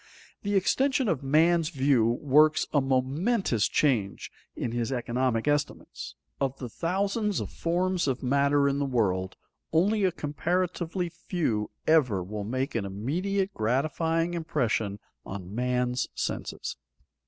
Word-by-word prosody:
The 205 0 -1
extension 260 +6 +2
of 165 -9 0
man's 160 +4 +3
view 135 -6 +3
works 150 +5 +4
a 145 - +4
momentous 135 - +1
change 115 -10 0 0.2
in 120 - -3
his 120 +1 -2
economic 125 -1 0
estimates. 145 0 -2 0.2
Of 135 -1 -1
the 125 - -6
thousands 200 - -1
of - - -5
forms 180 +1 0
of 130 -1 -1
matter 140 +2 +3
in 140 0 0
the 140 - +1
world, 95 -7 0 0.4
only 200 +6 +2
a 185 - +3
comparatively 175 +3 -2
few 160 - -2 0.2
ever 125 - +3
will 105 +3 -5
make 130 +6 -2
an 115 - -1
immediate 180 - -2
gratifying 155 +8 0
impression 115 -11 -1 0.3
on 95 -1 -7
man's 125 +1 0
senses. - - -4
140 Hz, 130 wpm, -28 LUFS, 120-175 Hz, 0.4 s, works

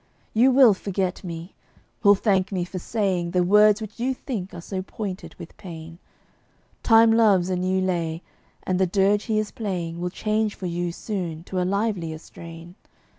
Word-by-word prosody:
You 240 +4 +5
will 255 -4 +7
forget 190 -1 -3
me; 170 0 -7 0.5
will 205 0 +6
thank 195 -1 +1
me 180 -3 -1
for 185 +1 -6
saying 185 -4 -1
The 180 0 +1
words 210 +3 +5
which 215 +1 -8
you 260 +2 0
think 210 -9 -5
are 175 - -8
so 185 +2 -5
pointed 195 0 -6
with 165 - -11
pain. 165 -3 -10 0.8
Time 225 -1 +6
loves 200 -5 +4
a - - +1
new 185 +1 0
lay; 170 -3 -2 0.4
and 185 0 -1
the 190 - +3
dirge 200 +3 +2
he 220 -3 0
is 215 -1 -1
playing 175 -6 -4
Will 180 - -1
change 215 +2 -1
for 190 - -7
you 175 0 -2
soon 170 -4 -5
to 185 +1 -3
a - - 0
livelier 200 -6 -1
strain. 165 +1 -12
190 Hz, 180 wpm, -24 LUFS, 175-210 Hz, 0.8 s, will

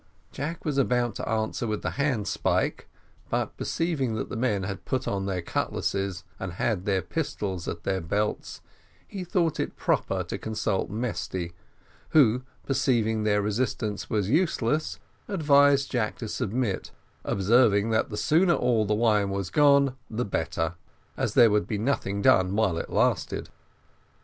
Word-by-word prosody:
Jack 160 +4 -5
was 145 -3 0
about 125 -3 +1
to - - -5
answer 110 +1 -1
with 105 -1 -3
the - - -1
handspike; 130 -8 0 0.4
but - - -1
perceiving 145 -9 -1
that 110 - -3
the - - -5
men 110 -5 0
had 100 0 -3
all - - -28
put 130 - -2
on 100 -1 -1
their 90 -3 -2
cutlasses, 95 +1 -2 0.2
and 95 -3 -4
had 100 0 -1
their 95 -3 +1
pistols 105 - -3
at 85 - -5
their 95 -1 -1
belts, 105 +6 -2 0.5
he 195 -3 -6
thought 175 -3 0 0.2
proper - - 0
to - - -5
consult 110 -3 -1
Mesty, 105 -6 -3 0.6
who, 125 -5 +5 0.2
perceiving 115 -5 +1
that 105 -1 +2
resistance 105 -1 -2
was 105 -3 0
useless, 150 - +1 0.3
advised 145 -6 +4
Jack 110 -4 -1
to 115 - -5
submit, 110 0 -2 0.3
observing, 105 +1 +3
that 110 - +1
the 105 - -5
sooner 170 - +3
all 120 -3 +2
the 105 - +2
wine 105 -3 +2
was 100 -2 -3
gone 140 -3 +4
the 120 +3 -2
better, 80 -2 -2 0.4
as - - -2
there 115 -3 +7
would 105 0 +1
be 110 - -2
nothing 100 -4 -1
done 95 +1 +4
while 100 -6 +1
it - - -5
lasted. - - 0
110 Hz, 155 wpm, -27 LUFS, 100-135 Hz, 0.6 s, there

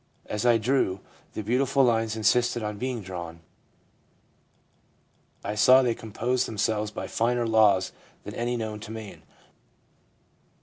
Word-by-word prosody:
As 105 +3 -2
I 120 -1 +6
drew, 110 -5 +1 0.3
the 110 - -4
beautiful 135 +5 +2
lines 115 -3 +1
insisted 120 +2 +2
on 105 -1 -4
being 125 -3 -3
drawn. 85 -3 -7 2.0
I 105 - -3
saw 130 +5 +6
they 120 -2 +1
composed 115 +3 -2
themselves 105 0 -1
by 105 - -6
finer 120 +1 0
laws 105 -4 +3 0.3
than - - -8
any 120 +1 -2
known 110 -2 -4
to 105 - -9
man. 110 -2 -8
110 Hz, 130 wpm, -26 LUFS, 105-120 Hz, 2.0 s, I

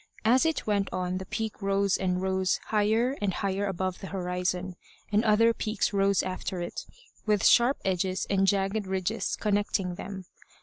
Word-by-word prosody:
As 255 +7 +4
it 320 - -1
went 200 -2 0
on 185 0 -2
the 190 - -8
peak 220 0 -4
rose 195 0 +2
and 180 -1 0
rose 190 -1 +1
higher 220 +5 +2
and 205 -2 +1
higher 200 +1 -1
above 185 -1 -2
the 195 - -7
horizon; 180 -1 -2 0.4
and 210 +2 +3
other 230 +1 +4
peaks 215 -1 -1
rose 195 -1 +2
after 185 0 -4
it, 175 - -5 0.4
with 210 -2 +2
sharp 245 +3 +5
edges 185 0 0
and 195 -1 +2
jagged 195 +1 +1
ridges 190 +3 -1
connecting 205 -3 0
them. 190 +1 -7
195 Hz, 165 wpm, -28 LUFS, 185-210 Hz, 0.4 s, sharp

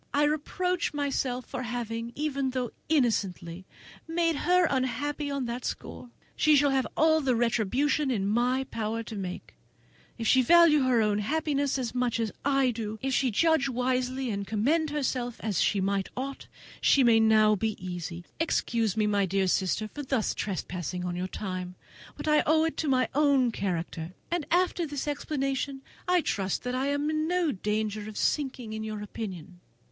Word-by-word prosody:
I 290 - +4
reproach 325 +3 0
myself 270 -3 -1
for 260 - -5
having, 235 -1 -4
even 280 -3 -1
though 255 -2 -2 0.2
innocently, 190 - 0 0.4
made 330 0 +1
her 360 +4 +3
unhappy 280 +3 -1
on 280 -2 -2
that 240 +1 -4
score. 250 - -6 0.3
She 305 -1 +4
shall 285 0 +4
have 265 -1 +1
all 315 0 +4
the 260 -3 +1
retribution 245 +6 +1
in 210 -7 0
my 245 +5 +1
power 225 +1 -2
to 225 - -8
make; 185 -3 -6 0.6
if 230 - -4
she 260 +3 +5
value 330 +2 +6
her 245 -3 +3
own 210 -1 +1
happiness 285 +3 0
as 245 -3 -3
much 250 -1 0
as 225 -2 -1
I 275 -2 +3
do, 220 -2 -5
if 270 0 0
she 260 0 +2
judge 295 +4 +2
wisely, 255 0 -1
and 200 -1 -3
command 295 +10 +1
herself 255 -5 -2
as 210 -6 0
she 205 - +2 0.4
ought, 270 +2 -5 0.3
she 275 - +5
may 230 -2 +5
now 215 -1 +5
be 220 +2 -1
easy. 175 -1 -6
Excuse 230 - 0
me, 215 - +3
my 205 -2 +2
dearest 190 0 +2
sister, 195 +3 -1
for 290 - -7
thus 260 -5 0
trespassing 180 -2 -4
on 175 -1 -3
your 180 +1 -2
time, 185 -2 -5 0.4
but - - -6
I 300 0 +5
owe 315 +1 +4
it 325 - -1
to 315 - -1
my 255 -3 +3
own 275 -4 +3
character; 175 -4 -3 0.2
and 345 -4 -1
after 355 -1 +1
this 290 0 -4
explanation 275 -2 -2 0.2
I 360 -1 +4
trust 195 - -2
I 255 +2 -1
am 285 +1 0
in 310 0 0
no 350 -3 +1
danger 210 +1 -2
of 215 - -9
sinking 260 -6 -1
in 220 0 -4
your 215 -1 -5
opinion." 185 -5 -7
250 Hz, 175 wpm, -28 LUFS, 215-285 Hz, 0.6 s, value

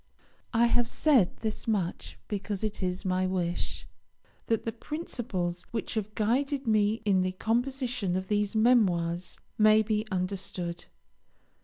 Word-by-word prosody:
I 235 +1 +5
have 240 0 +3
said 260 - +3
this 220 0 -2
much 175 - -1
because 205 0 -3
it 215 -1 -2
is 180 0 -2
my 185 0 +1
wish 175 -2 -2 0.6
that 225 -1 0
the 225 - -1
principles 225 - -4
which 225 - -3
have 215 -2 -3
guided 270 +6 0
me 215 0 +2
in 195 -3 +4
the 185 0 -1
composition 240 -1 -1
of 185 0 -2
these 210 0 0
Memoirs 185 -7 +2 0.2
may 215 0 +6
be 215 0 -1
understood. 185 -2 -3
210 Hz, 135 wpm, -29 LUFS, 185-230 Hz, 0.6 s, may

